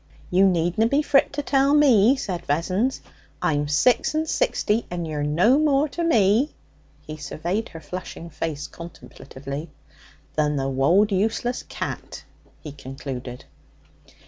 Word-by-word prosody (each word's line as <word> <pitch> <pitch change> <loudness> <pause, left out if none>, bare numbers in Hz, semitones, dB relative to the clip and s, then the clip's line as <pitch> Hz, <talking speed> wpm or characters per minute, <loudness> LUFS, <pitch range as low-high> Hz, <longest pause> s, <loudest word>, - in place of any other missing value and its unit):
'You 190 +2 +5
needna 175 +4 +1
be 280 +5 +1
frit 275 -2 +3
to 290 0 -3
tell 275 +1 +3
me,' 260 -5 +5
said 185 -9 -4
Vessons. 185 - 0 0.4
'I'm 145 -1 0
six 235 - +2
and 315 +1 0
sixty, 215 -5 0
and 175 -2 -4
you're 150 -2 -3
no 175 - +3
more 295 -1 +3
to 340 - -4
me' 230 - +3 0.6
he 155 0 -7
surveyed 170 +8 -3
her 165 - -10
flushing 180 0 -8
face 150 -1 -4
contemplatively 145 -3 -9 0.6
'than 150 -1 +1
the 135 -1 -1
wold 170 +11 +3
useless 225 +5 0
cat,' - - -6 0.4
he 150 - -7
concluded. 130 -2 -8
180 Hz, 135 wpm, -23 LUFS, 150-245 Hz, 0.6 s, You